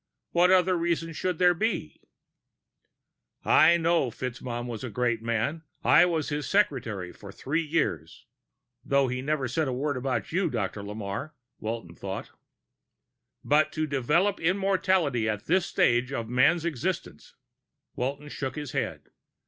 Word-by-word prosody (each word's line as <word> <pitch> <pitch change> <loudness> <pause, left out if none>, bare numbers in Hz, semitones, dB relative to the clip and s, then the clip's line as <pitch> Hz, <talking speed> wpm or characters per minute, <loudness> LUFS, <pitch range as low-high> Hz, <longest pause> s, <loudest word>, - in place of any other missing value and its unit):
What 175 +1 +4
other 185 0 +4
reason 170 -1 -1
should 180 +3 -2
there 180 0 +5
be?" 175 - -2 1.4
"I 170 +2 +6
know 165 -5 +2
FitzMaugham 120 0 -5
was 120 -2 -6
a 130 - -4
great 120 +1 0
man... 115 +7 -1 0.2
I 150 +5 +6
was 160 -4 -1
his 145 0 -3
secretary 115 - 0
for 100 - -11
three 150 +10 -2
years." 115 - -2 0.6
(Though 140 -1 +2
he 125 +1 -2
never 140 -1 -1
said 150 +5 0
a - - -1
word 140 +2 -1
about 130 0 -2
you, 180 +1 +1
Dr. 110 -5 -3
Lamarre, 105 +8 -5 0.2
Walton 110 -6 -5
thought.) 95 +2 -6 1.1
"But 150 +1 +3
to 155 - 0
develop 155 +8 +1
immortality 185 - +1
at 105 -1 -3
this 180 +1 +2
stage 120 +2 +2
of 115 -4 -3
man's 140 +8 +3
existence...." 170 +4 -4 0.6
Walton 140 +4 -3
shook 135 -2 -4
his 150 -3 -5
head. - - -4
140 Hz, 140 wpm, -27 LUFS, 120-170 Hz, 1.4 s, I